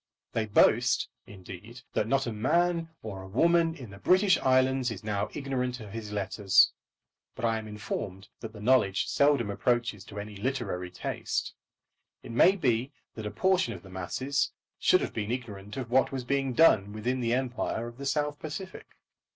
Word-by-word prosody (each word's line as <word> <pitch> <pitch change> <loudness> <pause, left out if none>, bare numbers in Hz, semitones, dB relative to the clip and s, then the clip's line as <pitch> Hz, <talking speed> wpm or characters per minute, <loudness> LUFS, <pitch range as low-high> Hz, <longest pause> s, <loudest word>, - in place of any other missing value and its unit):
They 110 -1 0
boast, 105 - +3 0.2
indeed, 105 +5 -11
that 105 - 0
not 135 +3 +2
a 120 - -3
man 165 +8 +1
or 100 -3 -6
a 95 - -9
woman 165 - +3
in 125 -10 -10
the 100 - -11
British 185 - +4
Islands 130 -1 +3
is 110 -4 -7
now 105 -2 -1
ignorant 125 -3 -2
of 105 -3 -9
his 110 -1 -6
letters; 100 -1 +3 0.6
but - - -3
I 115 -1 +1
am 110 - -8
informed 105 -2 -5
that 115 - -7
the 105 -1 -11
knowledge 105 -5 +3
seldom 140 -7 +2
approaches 120 -2 0
to 105 - -8
any 105 0 -7
literary 100 -5 -3
taste. - - -3 0.7
It - - -8
may 175 +11 +5
be 130 - 0 0.2
that 110 -2 -5
a - - -2
portion 180 - +1
of 90 -3 -10
the 95 - -13
masses 110 +10 -1 0.3
should - - +4
have - - -3
been 105 -1 -3
ignorant 105 -4 -5
of 125 -3 -5
what 130 +1 +3
was 135 -2 -3
being 135 0 0
done 105 -10 +5
within 120 +4 -2
the 115 0 +1
empire 125 -3 -2
of 120 +2 -10
the 140 - -4
South 145 +1 -1
Pacific. 185 +5 -7
120 Hz, 180 wpm, -29 LUFS, 105-135 Hz, 0.7 s, may